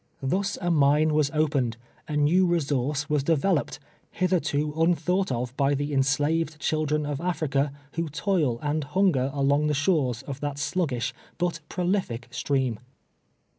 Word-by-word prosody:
Tlius 190 +8 0
a 175 -1 0
mine 150 0 +4
was 150 -2 +2
opened 140 -6 0
— - - -33
a 150 - -2
new 170 +6 +4
resource 145 -3 0
was 150 -1 +1
developed, 165 +2 +1 0.3
hitherto 155 -5 0
un 165 +2 +3
thought 185 0 0
of 125 0 -3
by 140 +1 +2
the 145 +1 -2
enslaved 145 +3 +1
children 155 -1 0
of 145 0 -3
Africa, 150 -5 0 0.2
who 165 -1 -2
toil 150 - 0
and 150 +1 0
hunger 145 -4 +2
along 140 +2 +2
the 150 - +1
shores 140 -6 +1
of 140 -1 -6
that 145 -1 -3
sluggish, 145 -5 -1 0.2
but 175 -2 -1
prolific 175 - -1
stream. 130 -6 -1
150 Hz, 150 wpm, -26 LUFS, 140-165 Hz, 0.3 s, mine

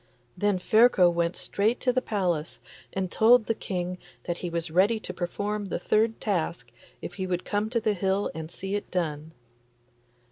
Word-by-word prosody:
Then 205 0 +1
Ferko 195 -2 +5
went 170 0 0
straight 220 +5 0
to 250 - +2
the 255 - +2
palace 175 -8 -1 0.3
and 190 -2 -2
told 230 +1 +5
the 225 - +1
King 180 -3 -4 0.2
that 175 -1 -3
he 175 - -3
was 170 -1 -3
ready 200 +6 +3
to 185 - -5
perform 205 +4 -3
the - - -2
third 220 +1 +1
task 180 -5 -2 0.3
if - - -5
he 190 -1 -4
would 180 -1 -2
come 210 +1 -1
to 235 0 +1
the 220 -1 +1
hill 195 +1 0
and 160 0 -6
see 195 +3 -5
it 205 0 -3
done. 160 -3 -2
190 Hz, 180 wpm, -27 LUFS, 175-215 Hz, 0.3 s, Ferko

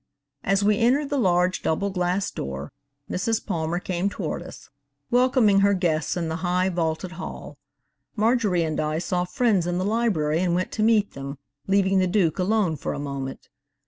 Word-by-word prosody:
As 195 +1 +2
we 205 0 +3
entered 275 +5 +2
the 285 - +1
large 180 -3 +2
double 195 +5 0
glass 180 +1 -1
door, 70 +1 -5 0.4
Mrs 220 +5 -1
Palmer 170 -3 -1
came 185 +1 -1
toward 180 -5 -4
us, 180 +1 -11 0.4
welcoming 245 -5 +4
her 200 0 +4
guests 165 -3 0
in 170 -2 -1
the 160 0 -2
high, 180 +1 +1
vaulted 170 0 -2
hall. - - -8 0.6
Marjorie 215 -5 +2
and 155 -1 -2
I 155 0 0
saw 180 +1 -1
friends 190 -2 +1
in 175 0 -1
the 185 - -1
library 200 -9 +1
and 175 -1 +1
went 185 +1 -1
to 215 - -3
meet 215 -2 +3
them, 140 +1 -7 0.3
leaving 195 -1 +3
the 185 - +2
Duke 180 -3 +1
alone 185 -4 +1
for - - -3
a - - -5
moment. 140 -2 -5
185 Hz, 175 wpm, -24 LUFS, 165-205 Hz, 0.6 s, welcoming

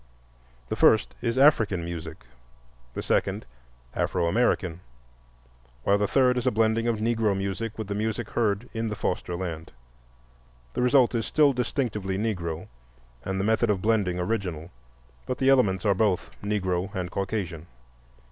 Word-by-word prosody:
The - - -1
first 110 - +4
is 120 0 -1
African 110 - +4
music, 80 -6 -7 0.7
the - - -3
second - - 0 0.5
Afro - - 0
American, 90 -3 +1 1.0
while 100 +1 +3
the 105 - +1
third 125 +2 +3
is 125 - -3
a - - +4
blending 110 +1 +2
of 115 -2 +1
Negro 110 -2 +1
music 100 +3 -3
with 110 - -3
the 100 - -2
music 110 +2 -2
heard 110 0 0
in 115 -1 -2
the 105 - -3
foster 90 -3 -2
land. 85 -3 -5 1.0
The - - -1
result 125 0 +4
is 115 -2 -1
still 150 -2 +4
distinctively 120 -6 -2
Negro 90 -7 -3 0.6
and 95 0 -2
the - - 0
method 110 +1 +2
of 95 -3 0
blending 105 -5 +1
original, 90 -4 -3 0.6
but 130 - -2
the 135 - +2
elements 105 -8 +3
are 100 - +4
both 100 -2 0
Negro 95 -3 -1
and 90 -2 -3
Caucasian. 95 -5 -3
105 Hz, 150 wpm, -26 LUFS, 95-115 Hz, 1.0 s, first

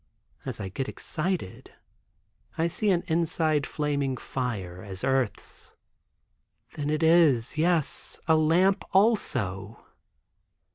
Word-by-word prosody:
As - - -5
I 95 - -4
get 130 +8 -4
excited, 165 - -4 0.8
I 165 - +2
see 205 +5 0
an 175 -3 +2
inside 160 -3 +1
flaming 140 -3 -1
fire, 100 -11 -4
as 95 -1 -5
earth's. 130 -4 -2 1.0
Then 145 -1 -3
it 155 +1 0
is—yes, 160 0 +2
a 160 - +5
lamp, 180 +5 +3
also. 115 - +1
150 Hz, 100 wpm, -27 LUFS, 125-170 Hz, 1.0 s, a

